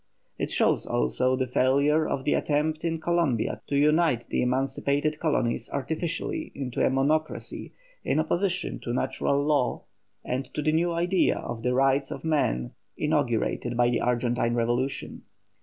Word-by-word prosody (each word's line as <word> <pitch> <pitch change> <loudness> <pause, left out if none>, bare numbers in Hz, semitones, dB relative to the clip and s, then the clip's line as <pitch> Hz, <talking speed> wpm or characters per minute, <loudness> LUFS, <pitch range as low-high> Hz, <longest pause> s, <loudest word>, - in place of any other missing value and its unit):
It - - -1
shows - - +1
also 125 - +1
the 130 0 0
failure 140 +5 +2
of 130 - -2
the 145 - +1
attempt 155 +1 0
in 165 -1 -1
Columbia 160 -8 0
to 140 - -2
unite 150 -4 +2
the - - 0
emancipated 135 +4 0
colonies 120 -7 0
artificially 170 - -3
into 130 -3 -2
a - - +4
monocracy 145 +4 -1 0.3
in - - +1
opposition 180 +3 -1
to 120 - -4
natural 140 +2 0
law 145 -5 +1 0.4
and 125 +1 -3
to 150 - -1
the 155 - +2
new 170 +2 +1
idea 175 +2 +2
of 120 -1 -5
the 125 +2 0
rights 135 +1 +2
of - - -7
man 65 - 0 0.3
inaugurated 120 - 0
by 120 0 +3
the 120 - 0
Argentine 120 -1 0
revolution. 120 +3 -1
140 Hz, 150 wpm, -26 LUFS, 125-155 Hz, 0.4 s, a